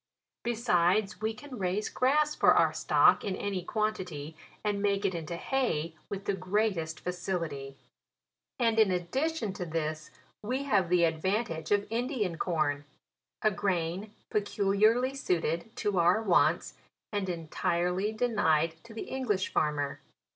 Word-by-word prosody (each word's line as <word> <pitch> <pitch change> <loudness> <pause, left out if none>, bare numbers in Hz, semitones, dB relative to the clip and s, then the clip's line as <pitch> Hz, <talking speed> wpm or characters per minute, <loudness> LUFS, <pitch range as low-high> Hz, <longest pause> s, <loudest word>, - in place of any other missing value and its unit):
Besides, 215 -3 +1
we 220 +1 0
can 260 0 -9
raise 190 +3 0
grass 300 +4 +2
for - - +5
our - - +4
stock - - +4
in 195 - -2
any 195 -3 -3
quantity, 180 -8 -3 0.3
and 205 -1 0
make 200 0 +1
it 190 - +1
into 170 0 -4
hay 170 - -1 0.2
with 200 0 -5
the 200 - +1
greatest 185 -4 -1
facility; 165 -7 -4 0.8
and 230 -2 +2
in 215 -3 +6
addition 220 - -1
to 185 - -5
this 155 -2 -3 0.3
we 255 +6 -2
have 200 -10 +2
the 180 -1 +4
advantage 165 +1 0
of 205 0 +2
Indian 230 - -1
corn, 155 -5 0 0.6
a 215 - +4
grain 190 0 -1 0.2
peculiarly 210 +5 +2
suited 170 - -1
to 205 -4 0
our 175 +5 +4
wants, 205 -6 +2 0.4
and 200 -2 -1
entirely 175 +3 -1
denied 175 -9 +1
to 225 -1 -12
the - - -4
English 220 -8 -2
farmer. 145 -2 0
195 Hz, 135 wpm, -30 LUFS, 170-220 Hz, 0.8 s, in